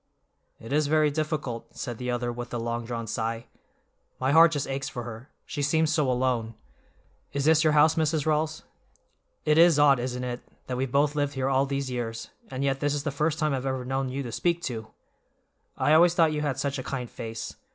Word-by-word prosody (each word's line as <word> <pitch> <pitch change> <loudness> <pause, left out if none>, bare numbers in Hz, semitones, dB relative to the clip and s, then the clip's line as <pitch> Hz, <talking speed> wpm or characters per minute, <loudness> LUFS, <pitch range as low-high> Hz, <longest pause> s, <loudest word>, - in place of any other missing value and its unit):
"It 115 +5 -7
is 150 0 +2
very 155 0 +3
difficult," 145 -7 -3
said 120 -4 -5
the 125 0 -3
other 120 0 -1
with 120 0 -7
a - - 0
long 115 0 -3
drawn 115 -1 -4
sigh. 115 +1 -3 0.7
"My 130 +1 +1
heart 165 +2 +7
just 145 -2 -2
aches 135 0 -3
for 120 - -6
her, 120 +3 -9 0.2
she 145 - -4
seems 155 +2 +2
so 150 -5 +2
alone. 125 -3 0 0.8
Is 140 0 -1
this 160 0 +5
your 155 -1 +3
house, 150 +1 +5
Mrs. 155 -2 0
Rawls? 155 0 0 0.8
It 150 +1 +4
is 170 -2 +7
odd, 145 -3 +5
isn't 125 0 -3
it, 125 -1 -4 0.2
that 130 - -3
we've 130 -1 -2
both 145 +2 +3
lived 145 -1 -1
here 135 0 0
all 135 +1 +2
these 140 -1 -2
years, 115 -2 -4 0.2
and 135 +1 -3
yet 135 -1 0
this 145 +1 0
is 145 - -3
the 145 - -1
first 150 +2 0
time 155 -2 +1
I've 135 0 -2
ever 130 -1 -2
known 135 0 -1
you 135 +2 -3
to 120 - -6
speak 170 +7 0
to. 110 -3 -4 0.9
I 150 - +3
always 170 +2 +6
thought 160 -2 +4
you 150 - -1
had 145 -4 -1
such 140 0 -2
a - - -4
kind 125 -2 -4
face. 115 -1 -6
135 Hz, 215 wpm, -27 LUFS, 125-150 Hz, 0.9 s, heart